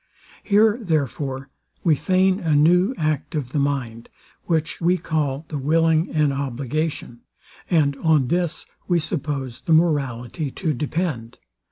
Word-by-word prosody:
Here, 215 +2 +3
therefore, 140 - -2 0.3
we 160 -3 +4
feign 185 +4 +2
a 160 -6 +1
new 180 - +4
act 155 +1 -1
of 135 -5 -3
the 145 - 0
mind, 130 -5 -2 0.4
which 160 -1 -1
we 175 +2 +3
call 155 -3 -2
the 150 - -3
willing 160 +3 +2
an 150 -2 +2
obligation; 135 -1 -3 0.5
and 150 -5 +2
on 150 -4 +2
this 175 -1 -1 0.2
we 175 - +3
suppose 140 -6 -3
the 165 - +2
morality 145 -3 +1
to 155 +3 -2
depend. 150 -4 -3
155 Hz, 135 wpm, -22 LUFS, 135-170 Hz, 0.5 s, we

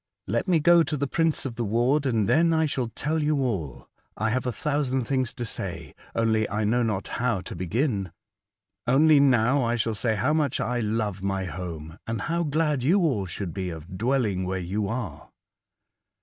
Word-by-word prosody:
" - - -58
Let - - 0
me 175 -3 +4
go 170 +2 +6
to 155 -2 -1
the 140 - 0
prince 165 +2 0
of 130 - -3
the 120 - -1
ward, 120 +7 +2
and 110 -5 +1
then 165 - +4
I 160 0 +3
shall 130 -5 -1
tell 155 +7 -2
you 150 0 +1
all. 95 - -3 0.3
I 110 0 0
have 130 +1 -1
a - - +1
thousand 140 -1 -1
things 130 -1 0
to 120 - -4
say, - - -5 0.2
only 110 -1 +1
I 105 +1 -1
know 115 +4 +2
not 105 -4 -1
how 115 -5 -1
to - - -8
begin. 100 - -1 0.8
Only 145 +4 +5
now 130 0 +4
I 120 0 +1
shall 115 -1 0
say 110 +1 0
how 105 +9 +1
much 150 -5 +1
I 125 -1 -1
love 105 -3 -1
my 95 -1 -1
home, 85 -3 -7
and 115 -2 -2
how 170 +1 -1
glad 150 -3 0
you 175 +10 +3
all 125 - +1
should 90 -1 -5
be 95 -1 -3
of 85 +2 -8
dwelling 115 -6 +1
where 95 +1 -2
you 95 +3 -2
are." 115 +2 -5
120 Hz, 200 wpm, -26 LUFS, 100-145 Hz, 0.8 s, go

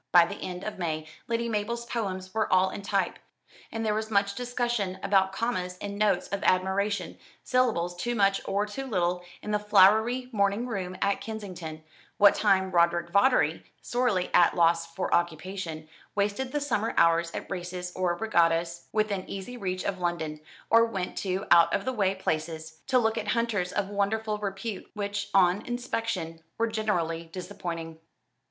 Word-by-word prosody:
By 175 -1 +8
the - - -7
end 180 0 -5
of 215 -2 -5
May, 155 -3 -2 0.2
Lady 235 0 0
Mabel's 230 +2 -2
poems 190 -6 -4
were 220 0 0
all 185 0 +4
in - - -6
type, 195 -2 -1 0.5
and 225 0 -3
there 215 - +2
was 220 +1 -2
much 200 -1 +2
discussion 240 -5 -2
about 190 -1 +3
commas 190 -4 -2
and 200 0 -5
notes 205 -4 +2
of 200 - -3
admiration, 190 +3 0 0.2
syllables 220 -9 +1
too 240 +7 -2
much 195 -2 +3
or 200 +1 0
too 265 +6 -6
little, 180 -5 0 0.2
in 210 - -4
the 210 - +2
flowery 215 +5 +4
morning 200 +1 +1
room 185 -6 -4
at 200 0 +1
Kensington, 180 -8 -7 0.3
what 205 -1 +7
time 190 -3 +2
Roderick 170 0 +2
Vawdrey 200 - +3 0.2
sorely 240 -7 0
at 175 - +6
a - - -9
loss 165 -1 +3
for 185 +2 -2
occupation 170 -1 -2 0.3
wasted 205 +6 0
the 295 - 0
summer 230 -6 -1
hours 165 0 +4
at - - -6
races 180 0 -4
or 180 -2 +1
regattas 170 -4 +1
within 210 -3 -1
easy 200 +6 -6
reach 185 -5 -3
of 195 -2 -2
London, 160 -3 -2 0.3
or 230 0 +7
went 195 -6 -3
to 190 0 -2
out 170 -1 +7
of - - -2
the 260 - -1
way 195 -4 +1
places, 160 -2 -3
to 260 - +3
look 225 -2 +2
at - - -5
hunters 220 -7 0
of 200 -1 -1
wonderful 210 +1 -1
repute, 200 0 -5
which, 205 0 -3
on 190 +2 +4
inspection, 225 -9 -3 0.2
were 230 - +2
generally 180 -7 -1
disappointing. 170 -2 -6
195 Hz, 170 wpm, -28 LUFS, 175-220 Hz, 0.5 s, By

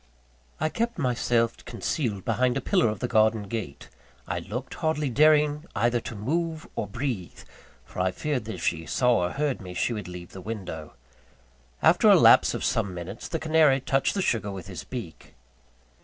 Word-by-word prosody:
I 155 - +1
kept 235 +6 -2
myself 120 -4 0
concealed 110 - -3
behind 125 -1 +1
a - - +1
pillar 115 - +2
of 105 - -5
the 125 - 0
garden 110 -2 +3
gate; 100 -8 -6 0.4
I - - -2
looked, 125 +6 -6
hardly 155 -4 -1
daring 150 +2 +4
either 120 +1 +2
to 115 - -7
move 160 +8 -2
or 105 - -2
breathe; 115 -4 -4 0.4
for - - -9
I 95 0 +2
feared 130 +3 -2
that 110 - -5
if 85 - -8
she 80 -2 -1
saw 125 +8 +3
or - - -6
heard 145 -4 -1
me, 90 -2 -8
she 120 - 0
would 105 -4 -5
leave 90 -1 -9
the 95 - -9
window. 90 -7 -6 0.9
After - - +5
a - - +9
lapse - - +6
of - - -4
some 100 -5 0
minutes, 85 0 -7
the 165 - -2
canary 155 -3 +4
touched 135 +5 0
the 195 - 0
sugar 105 - 0
with 95 -3 -7
his 90 -5 -7
beak. 115 - -8
115 Hz, 185 wpm, -26 LUFS, 100-145 Hz, 0.9 s, a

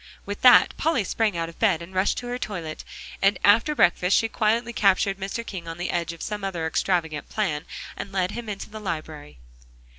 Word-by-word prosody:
With 205 0 -6
that, 250 -1 +7
Polly 315 -8 +1
sprang 210 -2 0
out 165 0 -1
of 165 - -13
bed, 195 -8 +3
and 170 +2 -10
rushed 190 +6 0
at - - -6
her 245 +1 -3
toilet, 170 -9 -5 0.4
and 195 +1 +3
after 225 +9 +4
breakfast 180 -3 +3
she 225 - +2
quietly 230 +2 0
captured 195 -1 +2
Mr. 200 +4 -4
King 180 -6 -7
on 165 0 -6
the 175 - -3
edge 170 -1 -1
of 170 - -9
some 210 -1 -4
other 175 -4 -2
extravagant 160 -2 -1
plan, 165 -8 -2 0.3
and 200 - -7
led 185 -1 0
him 235 -1 -6
into 200 -1 -5
the 215 - -7
library. 155 -6 -6
195 Hz, 205 wpm, -25 LUFS, 170-215 Hz, 0.4 s, that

